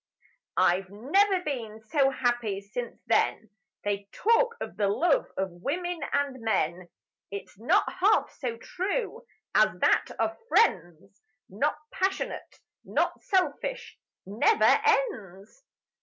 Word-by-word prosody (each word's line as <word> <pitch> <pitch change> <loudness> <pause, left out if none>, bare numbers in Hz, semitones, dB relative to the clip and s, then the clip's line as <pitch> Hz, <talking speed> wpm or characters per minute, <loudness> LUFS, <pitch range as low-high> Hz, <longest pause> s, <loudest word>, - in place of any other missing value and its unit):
I've 185 +2 +3
never 360 - +2
been 230 -8 -4
so 280 -4 +4
happy 240 -6 -1
since 230 +4 -6
then: 220 - +1 0.3
They 200 -1 -2
talk 465 +2 +2
of - - -6
the 205 - +1
love 295 - +2
of 190 -1 -1
women 335 - -3
and 280 -3 -1
men, 180 -5 -1 0.4
It's 200 0 -8
not 350 - +3 0.2
half 415 +3 +3
so 240 -4 -3
true 400 - -3 0.3
as - - +4
that - - +3
of - - -1
friends; 195 - +1 0.3
Not 275 +11 0
passionate, 380 +1 -3 0.2
not - - -1
selfish, 385 +7 -1 0.3
Never 230 - +2 0.2
ends 255 - -1
260 Hz, 115 wpm, -27 LUFS, -, 0.4 s, so